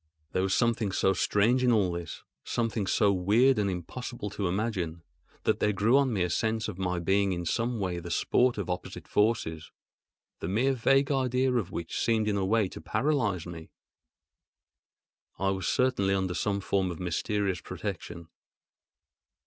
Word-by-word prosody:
There 95 Hz, -, 0 dB
was 95 Hz, 0 st, +1 dB
something 115 Hz, -4 st, +1 dB
so 95 Hz, +1 st, +2 dB
strange 105 Hz, +8 st, +2 dB
in 125 Hz, -, +4 dB
all 100 Hz, -6 st, +3 dB
this, 85 Hz, -1 st, -6 dB, 0.2 s
something 115 Hz, -4 st, -1 dB
so 100 Hz, +1 st, +3 dB
weird 110 Hz, +7 st, +3 dB
and 100 Hz, -1 st, +1 dB
impossible 105 Hz, +4 st, -5 dB
to 100 Hz, -3 st, -2 dB
imagine, 90 Hz, -4 st, -2 dB, 0.4 s
that -, -, +1 dB
there 105 Hz, -, +2 dB
grew 110 Hz, +6 st, +3 dB
on 140 Hz, -2 st, +3 dB
me 100 Hz, -5 st, +1 dB
a 90 Hz, -, -1 dB
sense 110 Hz, +3 st, 0 dB
of 100 Hz, -4 st, -6 dB
my 90 Hz, -1 st, -1 dB
being 95 Hz, +3 st, +1 dB
in 85 Hz, -1 st, -4 dB
some 115 Hz, +6 st, -1 dB
way 90 Hz, -3 st, -2 dB
the 85 Hz, +1 st, -8 dB
sport 125 Hz, +8 st, +2 dB
of 100 Hz, -, -3 dB
opposite 90 Hz, 0 st, -5 dB
forces—the 105 Hz, -6 st, -3 dB
mere 120 Hz, +9 st, +2 dB
vague 135 Hz, +3 st, +2 dB
idea 130 Hz, -1 st, +1 dB
of 115 Hz, -8 st, 0 dB
which 85 Hz, -1 st, -4 dB
seemed 110 Hz, -2 st, +2 dB
in 105 Hz, -, +1 dB
a 100 Hz, -, 0 dB
way 105 Hz, +1 st, +2 dB
to -, -, -9 dB
paralyse 115 Hz, -, 0 dB
me. 80 Hz, -2 st, -9 dB, 1.7 s
I 95 Hz, -, 0 dB
was 95 Hz, -2 st, -3 dB
certainly 100 Hz, -7 st, +2 dB
under 95 Hz, -2 st, -1 dB
some 100 Hz, +4 st, -1 dB
form 95 Hz, -1 st, 0 dB
of 85 Hz, -, -6 dB
mysterious 95 Hz, +1 st, -1 dB
protection. 85 Hz, -1 st, -6 dB
100 Hz, 165 wpm, -28 LUFS, 90-115 Hz, 1.7 s, in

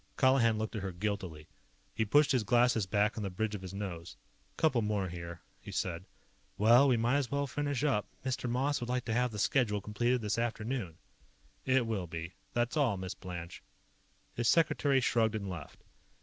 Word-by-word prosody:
Colihan 130 Hz, -4 st, +4 dB
looked 110 Hz, +1 st, -3 dB
at 105 Hz, -, -3 dB
her 95 Hz, 0 st, -3 dB
guiltily. 90 Hz, -5 st, -4 dB, 0.5 s
He 110 Hz, -, 0 dB
pushed 145 Hz, +7 st, +4 dB
his 130 Hz, -, +3 dB
glasses 120 Hz, -2 st, +3 dB
back 105 Hz, +2 st, +1 dB
on -, -, -2 dB
the 100 Hz, -, -2 dB
bridge 105 Hz, +4 st, -2 dB
of 105 Hz, -, -5 dB
his 95 Hz, -1 st, -7 dB
nose. 95 Hz, -4 st, -6 dB, 0.4 s
"Couple 130 Hz, -7 st, +3 dB
more 105 Hz, -3 st, -1 dB
here," 85 Hz, -1 st, -7 dB, 0.2 s
he -, -, -10 dB
said. 85 Hz, 0 st, -2 dB, 0.5 s
"Well, 120 Hz, +6 st, +6 dB
we 125 Hz, -3 st, +4 dB
might 120 Hz, +4 st, +2 dB
as 140 Hz, -4 st, -1 dB
well 140 Hz, 0 st, 0 dB
finish 145 Hz, -1 st, -2 dB
up. 130 Hz, -9 st, +1 dB, 0.2 s
Mr. 130 Hz, -1 st, -2 dB
Moss 135 Hz, +4 st, 0 dB
would 120 Hz, -, -4 dB
like 125 Hz, -1 st, -1 dB
to 110 Hz, -, -1 dB
have 125 Hz, +2 st, +2 dB
the 105 Hz, -, -7 dB
schedule 105 Hz, -1 st, +2 dB
completed 120 Hz, +5 st, 0 dB
this 105 Hz, +2 st, 0 dB
afternoon." 115 Hz, -6 st, -3 dB, 0.7 s
"It 130 Hz, -2 st, +3 dB
will 105 Hz, -6 st, -2 dB
be. 85 Hz, +1 st, -6 dB, 0.2 s
That's 120 Hz, +2 st, 0 dB
all, 130 Hz, -10 st, +2 dB
Miss 95 Hz, 0 st, -4 dB
Blanche." 85 Hz, -2 st, -8 dB, 0.7 s
His 120 Hz, -1 st, -1 dB
secretary 145 Hz, -4 st, +3 dB
shrugged 115 Hz, -3 st, +2 dB
and 100 Hz, -2 st, -3 dB
left. 90 Hz, -2 st, -8 dB
110 Hz, 190 wpm, -32 LUFS, 95-125 Hz, 0.7 s, Well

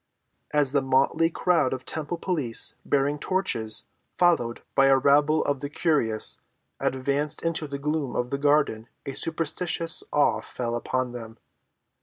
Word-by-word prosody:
As 145 Hz, -3 st, +2 dB
the 140 Hz, -1 st, +2 dB
motley 135 Hz, +5 st, +2 dB
crowd 165 Hz, -6 st, +1 dB
of 130 Hz, -1 st, -6 dB
temple 160 Hz, +2 st, -3 dB
police, 150 Hz, -11 st, +1 dB
bearing 145 Hz, +1 st, 0 dB
torches, 120 Hz, -, -1 dB, 0.3 s
followed 160 Hz, -10 st, +1 dB
by 135 Hz, 0 st, +4 dB
a 135 Hz, 0 st, +5 dB
rabble 145 Hz, +3 st, +3 dB
of 140 Hz, -2 st, -1 dB
the 145 Hz, -, -5 dB
curious, 140 Hz, -9 st, +1 dB, 0.4 s
advanced 140 Hz, +3 st, -1 dB
into 165 Hz, -2 st, +1 dB
the 140 Hz, 0 st, -5 dB
gloom 150 Hz, -1 st, -2 dB
of 125 Hz, 0 st, -2 dB
the 140 Hz, -, -2 dB
garden 145 Hz, -6 st, +1 dB, 0.2 s
a 135 Hz, -, -5 dB
superstitious 165 Hz, +2 st, 0 dB
awe 115 Hz, -7 st, +2 dB
fell 120 Hz, +1 st, -4 dB
upon 130 Hz, +1 st, -2 dB
them. 115 Hz, -2 st, -9 dB
140 Hz, 145 wpm, -25 LUFS, 130-155 Hz, 0.4 s, a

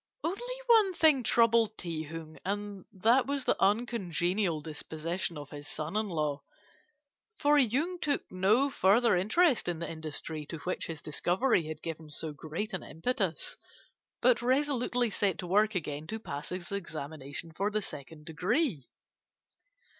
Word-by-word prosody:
Only 375 Hz, +7 st, -2 dB, 0.2 s
one 445 Hz, -6 st, +5 dB
thing 310 Hz, -5 st, +5 dB
troubled 230 Hz, -2 st, +3 dB
Ti 165 Hz, -3 st, -3 dB
Hung, 160 Hz, 0 st, -8 dB
and 205 Hz, -1 st, -3 dB
that 230 Hz, +8 st, +3 dB
was 280 Hz, -1 st, -1 dB
the -, -, +3 dB
uncongenial 195 Hz, -5 st, +1 dB
disposition 160 Hz, +3 st, -4 dB
of 145 Hz, -1 st, -8 dB
his 145 Hz, 0 st, -8 dB
son 155 Hz, +5 st, -4 dB
in 215 Hz, -1 st, 0 dB
law, 150 Hz, -4 st, -1 dB, 1.0 s
for 295 Hz, -3 st, +4 dB
Yung 290 Hz, +9 st, +1 dB
took 290 Hz, -3 st, 0 dB
no 215 Hz, +10 st, +3 dB
further 215 Hz, +1 st, +4 dB
interest 235 Hz, -, +3 dB
in 175 Hz, -2 st, -1 dB
the 170 Hz, 0 st, -4 dB
industry 155 Hz, -1 st, -5 dB
to 165 Hz, -, -5 dB
which 180 Hz, -, -2 dB
his 160 Hz, -2 st, -6 dB
discovery 175 Hz, -, +1 dB
had 155 Hz, 0 st, -7 dB
given 160 Hz, -1 st, -6 dB
so 150 Hz, +1 st, -3 dB
great 160 Hz, +9 st, -5 dB
an 185 Hz, -, -2 dB
impetus, 190 Hz, -1 st, -2 dB, 0.7 s
but 245 Hz, -1 st, +5 dB
resolutely 250 Hz, -2 st, +1 dB
set 195 Hz, -2 st, +1 dB
to 180 Hz, -, -5 dB
work 210 Hz, +4 st, +3 dB
again 150 Hz, -3 st, -3 dB
to 220 Hz, -, -3 dB
pass 145 Hz, -9 st, -6 dB
his 180 Hz, 0 st, -6 dB
examination 155 Hz, -4 st, -5 dB
for 200 Hz, +5 st, 0 dB
the 215 Hz, 0 st, -1 dB
second 150 Hz, +1 st, -9 dB
degree. 180 Hz, -, 0 dB
185 Hz, 150 wpm, -31 LUFS, 160-235 Hz, 1.0 s, one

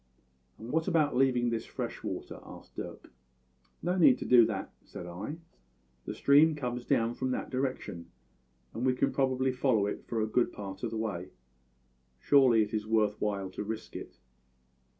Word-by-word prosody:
"`And 115 Hz, +2 st, -7 dB
what 160 Hz, +2 st, 0 dB
about 155 Hz, -6 st, +2 dB
leaving 125 Hz, -2 st, +3 dB
this 115 Hz, -1 st, -3 dB
fresh -, -, -5 dB
water?' -, -, -5 dB
asked -, -, -13 dB
Dirk. -, -, -8 dB, 0.7 s
"`No 180 Hz, +1 st, +1 dB
need 130 Hz, -7 st, +7 dB
to -, -, -6 dB
do 120 Hz, -3 st, +7 dB
that,' 100 Hz, -4 st, -4 dB
said -, -, -9 dB
I. 95 Hz, -, -6 dB, 0.7 s
`The -, -, -4 dB
stream 150 Hz, +3 st, +5 dB
comes 125 Hz, -4 st, -4 dB
down 115 Hz, +1 st, +1 dB
from 130 Hz, +1 st, -2 dB
that 130 Hz, -, -3 dB
direction, 130 Hz, -10 st, -3 dB, 0.7 s
and 115 Hz, -, -4 dB
we 130 Hz, -1 st, +2 dB
can -, -, +1 dB
probably 130 Hz, -1 st, +1 dB
follow 125 Hz, -5 st, +2 dB
it 105 Hz, -, -5 dB
for 115 Hz, -, -2 dB
a 110 Hz, -, +2 dB
good 120 Hz, +3 st, +1 dB
part 100 Hz, -2 st, -7 dB
of -, -, -2 dB
the 115 Hz, -, -4 dB
way. 95 Hz, -5 st, -3 dB, 0.9 s
Surely 125 Hz, -, +5 dB
it 105 Hz, -, -7 dB
is 110 Hz, -1 st, -2 dB
worth 110 Hz, -2 st, +1 dB
while 100 Hz, -2 st, -2 dB
to 100 Hz, -, -5 dB
risk 110 Hz, +1 st, -6 dB
it.' -, -, -8 dB
120 Hz, 175 wpm, -30 LUFS, 105-130 Hz, 0.9 s, need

